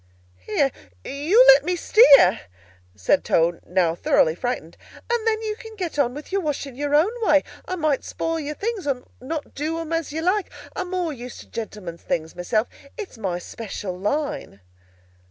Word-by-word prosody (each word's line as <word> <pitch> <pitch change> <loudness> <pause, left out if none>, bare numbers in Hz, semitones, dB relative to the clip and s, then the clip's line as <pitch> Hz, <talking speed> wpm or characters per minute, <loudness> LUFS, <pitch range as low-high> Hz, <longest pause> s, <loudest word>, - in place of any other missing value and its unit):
"Here, 270 - +1 0.3
you 335 - +4
let - - +9
me 360 - 0
steer!" 280 - +7 0.6
said 95 -3 +2
Toad, 170 +1 +2
now 175 -2 +2
thoroughly 160 -1 +3
frightened, 180 -4 -4 0.4
"and 465 -1 0
then 440 0 +1
you 430 -1 -2
can 445 0 -11
get 350 -7 -4
on 250 -2 +2
with 295 +4 -9
your 395 0 +1
washing 285 -4 -3
your 290 +2 0
own 325 +8 +4
way. 305 -9 +4 0.2
I 370 - -2
might 310 -5 0
spoil 330 0 -2
your 300 0 -4
things, 420 -4 -3
or 255 -3 -1 0.2
not 300 +3 -5
do 310 +3 -2
'em 330 0 -4
as 330 -3 -1
you 320 +2 -3
like. 375 +3 +1 0.3
I'm 360 - -3
more 355 -4 -1
used 250 -1 -9
to - - -15
gentlemen's 210 -7 -6
things 160 -1 -3
myself. 215 +6 0 0.3
It's 390 - -7
my 185 -5 -2
special 195 0 -6
line." 210 - -3
290 Hz, 175 wpm, -23 LUFS, 215-355 Hz, 0.6 s, let